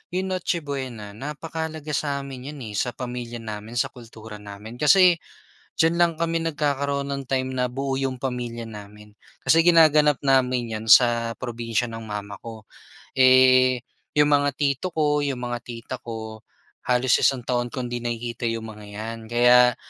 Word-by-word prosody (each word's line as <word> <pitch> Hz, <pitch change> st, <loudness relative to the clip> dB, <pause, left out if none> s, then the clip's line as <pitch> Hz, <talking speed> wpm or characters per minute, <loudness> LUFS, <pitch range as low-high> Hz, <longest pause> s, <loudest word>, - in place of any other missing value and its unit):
'yong 190 Hz, +1 st, -1 dB
Noche 180 Hz, -2 st, -1 dB
Buena 130 Hz, -7 st, -5 dB
napakahalaga 155 Hz, +5 st, -6 dB
sa'min 140 Hz, -2 st, -3 dB
'yan, 135 Hz, -, -8 dB
eh, -, -, -8 dB
sa 125 Hz, -, -2 dB
pamilya 120 Hz, -2 st, -6 dB
namin, 110 Hz, +1 st, -7 dB
sa 135 Hz, +2 st, 0 dB
kultura 110 Hz, -3 st, -11 dB
namin. 105 Hz, +3 st, -10 dB
Kasi 180 Hz, +5 st, +6 dB, 0.6 s
diyan 165 Hz, +1 st, +3 dB
lang 170 Hz, -1 st, +4 dB
kami 165 Hz, +1 st, -1 dB
nagkakaroon 140 Hz, -3 st, -1 dB
ng 140 Hz, 0 st, -3 dB
time 130 Hz, -1 st, -1 dB
na 125 Hz, -1 st, 0 dB
buo 135 Hz, +1 st, -3 dB
'yong 135 Hz, -1 st, -1 dB
pamilya 125 Hz, -2 st, -4 dB
namin. 105 Hz, -1 st, -11 dB, 0.3 s
Kasi 165 Hz, -, +4 dB
ginaganap 155 Hz, -5 st, +5 dB
namin 130 Hz, -3 st, +2 dB
'yan 110 Hz, 0 st, -4 dB
sa 115 Hz, 0 st, +5 dB
probinsiya 120 Hz, -1 st, -3 dB
ng 115 Hz, -, -6 dB
mama 100 Hz, -1 st, -6 dB
ko. 115 Hz, -2 st, -10 dB, 0.5 s
Eh, 130 Hz, -1 st, +6 dB, 0.4 s
'yong 150 Hz, 0 st, +5 dB
mga 145 Hz, 0 st, +4 dB
tito 140 Hz, +3 st, 0 dB
ko, 150 Hz, -3 st, +1 dB
'yong 140 Hz, -3 st, -2 dB
mga 120 Hz, -1 st, -4 dB
tita 120 Hz, +1 st, -7 dB
ko, 110 Hz, -1 st, -7 dB, 0.5 s
halos 125 Hz, 0 st, +3 dB
isang 130 Hz, -2 st, +3 dB
taon 120 Hz, -1 st, 0 dB
kong 125 Hz, -1 st, -4 dB
hindi 120 Hz, 0 st, -3 dB
nakikita 120 Hz, 0 st, -3 dB
'yong 115 Hz, -1 st, -4 dB
mga 105 Hz, -1 st, -10 dB
'yan. 115 Hz, +2 st, -5 dB
Kaya 125 Hz, 0 st, +5 dB
125 Hz, 160 wpm, -24 LUFS, 115-140 Hz, 0.6 s, Kasi